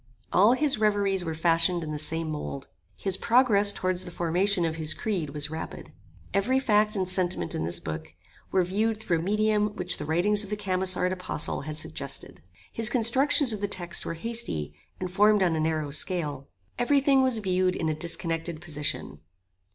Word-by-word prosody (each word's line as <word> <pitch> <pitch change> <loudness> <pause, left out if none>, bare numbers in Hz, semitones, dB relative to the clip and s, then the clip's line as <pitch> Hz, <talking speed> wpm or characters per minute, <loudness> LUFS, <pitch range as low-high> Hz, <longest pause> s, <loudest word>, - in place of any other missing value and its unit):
All 205 +6 +5
his 280 -3 +2
reveries 200 -3 +1
were 160 -2 -4
fashioned 165 +1 +2
in 155 - -5
the 150 - -4
same 160 +1 -2
mould. 140 -3 -6 0.3
His 190 -1 -1
progress 225 -4 +5
towards 185 -2 -1
the 180 - -8
formation 175 +2 0
of 160 0 -3
his 155 -1 +2
creed 185 -8 -3
was 145 0 +2
rapid. 160 - -7 0.4
Every 240 +7 +2
fact 215 -4 +2
and 190 -2 -1
sentiment 175 - -1
in - - -2
this 85 - -3
book 80 +1 -7 0.4
were 185 - +3
viewed 215 +5 -1
through 175 -6 -1
a - - -3
medium 210 +2 0
which 180 0 +2
the 150 - -5
writings 195 +7 +2
of 200 - -9
the 210 - -3
Camissard 185 -2 0
apostle 180 -4 -2
had 150 +1 -6
suggested. - - -6 0.3
His 225 -1 +2
constructions 260 +2 +3
of 210 - -6
the 205 - 0
text 175 -3 +1
were 165 - -5
hasty, 165 - -2 0.3
and 185 -1 -4
formed 210 +1 +4
on 170 -3 +1
a - - -1
narrow 155 -2 -1
scale. 150 -4 0 0.3
Every 280 +4 +3
thing 275 -1 +3
was 260 -3 +1
viewed 185 -3 0
in 165 - -2
a 155 - 0
disconnected 165 0 -3
position. 145 - -4
185 Hz, 185 wpm, -26 LUFS, 160-210 Hz, 0.4 s, All